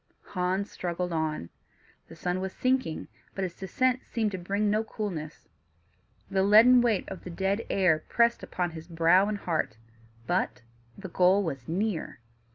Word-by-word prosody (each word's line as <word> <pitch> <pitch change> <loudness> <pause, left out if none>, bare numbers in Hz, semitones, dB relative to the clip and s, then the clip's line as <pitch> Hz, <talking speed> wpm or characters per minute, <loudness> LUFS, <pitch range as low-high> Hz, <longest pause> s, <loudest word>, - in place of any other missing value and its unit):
Hans 185 +2 -1
struggled 175 0 -3
on. 155 - -2 0.6
The - - -12
sun 180 +1 -2
was 190 0 -4
sinking, 255 -10 0 0.3
but 195 - -2
its 180 -2 -3
descent 250 +8 0
seemed 220 -3 -1
to 190 - -4
bring 200 +4 -1
no 215 +2 +2
coolness; 180 -9 -6 0.8
the 190 - +1
leaden 225 +5 +7
weight 230 -5 +1
of 190 - -8
the - - -7
dead 195 +5 -1
air 175 -5 +2
pressed 235 0 +3
upon 175 -1 -3
his 160 0 -9
brow 170 +3 +4
and 210 - -2
heart, 160 - -2 0.5
but 115 +1 -1 0.3
the 195 -2 -8
goal 185 +3 +4
was 135 -8 -5
near. 190 +1 -2
190 Hz, 160 wpm, -28 LUFS, 170-210 Hz, 0.8 s, leaden